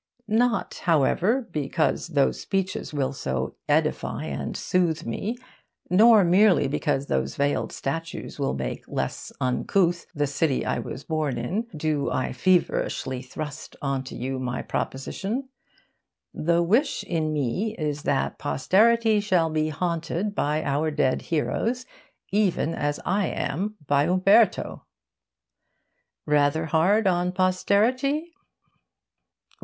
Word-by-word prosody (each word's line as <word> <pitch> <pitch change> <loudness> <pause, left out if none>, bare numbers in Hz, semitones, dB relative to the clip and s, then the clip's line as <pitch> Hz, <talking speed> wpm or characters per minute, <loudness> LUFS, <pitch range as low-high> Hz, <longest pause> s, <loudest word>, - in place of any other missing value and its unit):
Not, 230 +1 +1
however, 185 - +2
because 155 +2 0
those 145 -5 +1
speeches 195 -1 -2
will 140 -2 -1
so 65 - -3 0.2
edify - - 0
and - - -4
soothe 175 -4 0
me, 210 - -3 0.5
nor 215 +2 +7
merely 185 -1 +4
because 140 0 -1
those 65 - -1
veiled 145 +1 0
statues 165 +2 -5
will 140 - 0
make 65 - -4
less - - -4
uncouth 170 +7 +1
the 145 0 +1
city 140 0 0
I - - -1
was 130 - -6
born 155 -5 -1
in, 190 - -2
do 150 -2 0
I 130 - -1
feverishly 130 -4 +1
thrust 150 +3 -7
on 135 -2 -1
you 130 +2 -4
my 125 -1 -3
proposition. 210 - -3 0.8
The 170 +2 +1
wish 235 - +1
in 160 -3 -1
me 155 - -1
is 150 -2 -2
that 140 -1 -1
posterity 215 - +3
shall 180 -6 +1
be 155 0 0
haunted 170 +4 -2
by 155 -4 0
our 145 +3 0
dead 145 -4 +1
heroes 230 - -1 0.5
even 190 -5 +1
as 145 -1 -2
I 195 -1 +1
am 200 +10 -2
by 140 +1 +3
Umberto. 185 +4 +3 1.4
Rather 150 +2 +2
hard 185 +7 +3
on 180 -1 +2
posterity? 225 - +1
165 Hz, 120 wpm, -25 LUFS, 145-200 Hz, 1.4 s, nor